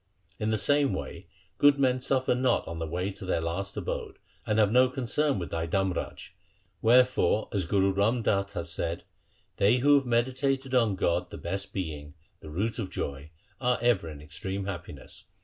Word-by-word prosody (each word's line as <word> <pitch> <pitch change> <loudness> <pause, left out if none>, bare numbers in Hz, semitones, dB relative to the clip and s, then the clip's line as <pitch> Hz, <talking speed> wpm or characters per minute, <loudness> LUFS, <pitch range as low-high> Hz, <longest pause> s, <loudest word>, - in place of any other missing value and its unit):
In 105 0 -1
the 110 - +1
same 145 +4 +2
way - - -6 0.3
good 145 -1 +6
men 130 -2 +2
suffer 130 0 +1
not 125 +1 +1
on 85 0 -5
the 80 - -3
way 90 +5 -2
to 95 - -9
their 95 -3 0
last 90 +5 -3
abode, - - -4 0.3
and 105 - +1
have 105 -2 +4
no 125 +2 +5
concern 135 +3 0
with 85 -3 -5
thy 80 0 -2
Dharmraj. 95 +1 -2 0.5
Wherefore 120 -4 +4
as 100 -4 0
Guru 95 +1 +2
Ram 110 +5 +1
Das 100 -1 0
hath 85 -4 -3
said: 85 0 -3 0.3
— - - -39
They 105 +5 +4
who 145 +3 +4
have 135 - -9
meditated 130 +3 0
on 115 -6 +3
God 90 -1 0
the - - -8
best 95 +3 -4
Being, 75 -5 -5 0.2
the 80 - -11
Root 105 +10 -2
of 95 -4 -3
joy, 70 +2 -5 0.3
are 125 -1 +1
ever 115 -8 +2
in 75 -1 -10
extreme 95 +6 -4
happiness. 85 -9 -8
100 Hz, 185 wpm, -28 LUFS, 85-125 Hz, 0.5 s, good